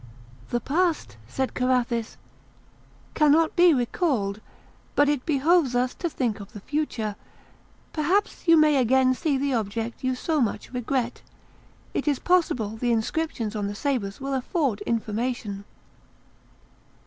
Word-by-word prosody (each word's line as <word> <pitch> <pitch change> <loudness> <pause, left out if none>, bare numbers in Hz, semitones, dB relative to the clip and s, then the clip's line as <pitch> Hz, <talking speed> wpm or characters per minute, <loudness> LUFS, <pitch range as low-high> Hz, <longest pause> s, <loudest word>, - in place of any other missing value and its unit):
"The 240 - 0
past," 310 - 0
said 265 - -2
Carathis, 250 -2 0 1.0
"cannot 315 +1 +4
be 350 0 +6
recalled, 240 - 0 0.5
but 290 - +4
it 290 -1 0
behoves 300 -2 +3
us 250 +1 +1
to 345 - -3
think 240 -8 -2
of 200 - -11
the 210 - -8
future; 225 -5 -2 0.8
perhaps 360 +6 0
you 330 0 +7
may 305 -2 +5
again 260 +1 +4
see 285 +1 0
the 275 0 0
object 225 +1 -3
you 255 0 +1
so 310 +3 0
much 235 +2 -2
regret; 245 0 -2 0.7
it - - -2
is 290 -2 +2
possible 330 - +1
the 240 +1 0
inscriptions 230 -1 -1
on 205 -1 -1
the 205 - -5
sabres 215 -6 -2
will 275 0 -3
afford 265 - -1
information. 220 -2 -2
255 Hz, 135 wpm, -25 LUFS, 225-300 Hz, 1.0 s, you